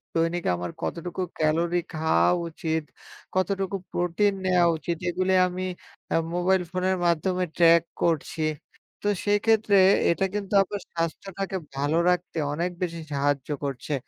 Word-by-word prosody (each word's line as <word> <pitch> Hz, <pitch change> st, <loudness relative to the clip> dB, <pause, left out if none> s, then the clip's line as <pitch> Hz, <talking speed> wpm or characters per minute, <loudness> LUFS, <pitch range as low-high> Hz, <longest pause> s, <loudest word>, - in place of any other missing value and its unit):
দৈনিক 165 Hz, +1 st, +1 dB
আমার 85 Hz, -1 st, -4 dB
কতটুকু 175 Hz, +2 st, -4 dB, 0.2 s
ক্যালোরি 165 Hz, +3 st, +2 dB
খাওয়া 90 Hz, -, +3 dB, 0.2 s
উচিত 160 Hz, -1 st, -2 dB, 0.5 s
কতটুকু 190 Hz, +1 st, 0 dB, 0.2 s
প্রোটিন 180 Hz, +4 st, +1 dB
নেওয়া 180 Hz, -2 st, +4 dB
উচিত 170 Hz, +1 st, -3 dB
এগুলি 185 Hz, +2 st, 0 dB
আমি 185 Hz, +1 st, -4 dB, 0.5 s
আ -, -, +4 dB, 0.2 s
মোবাইল 180 Hz, +1 st, +2 dB
ফোনের 185 Hz, 0 st, 0 dB
মাধ্যমে 180 Hz, +2 st, +1 dB
ট্রাক 170 Hz, -1 st, +6 dB, 0.2 s
করছি, 160 Hz, -1 st, 0 dB, 0.6 s
তো 205 Hz, -, -2 dB, 0.2 s
সেক্ষেত্রে 210 Hz, 0 st, +3 dB, 0.3 s
এটা 195 Hz, +3 st, +1 dB
কিন্তু 205 Hz, -1 st, -4 dB
আমার 200 Hz, +1 st, -6 dB
স্বাস্থ্যটাকে 190 Hz, +3 st, -3 dB, 0.2 s
ভালো 145 Hz, +4 st, 0 dB
রাখতে 180 Hz, -1 st, -1 dB, 0.2 s
অনেক 175 Hz, +4 st, -1 dB
বেশি 170 Hz, -2 st, -2 dB
সাহায্য 140 Hz, 0 st, 0 dB
করছে। 140 Hz, +1 st, -3 dB
175 Hz, 130 wpm, -26 LUFS, 160-185 Hz, 0.6 s, ট্রাক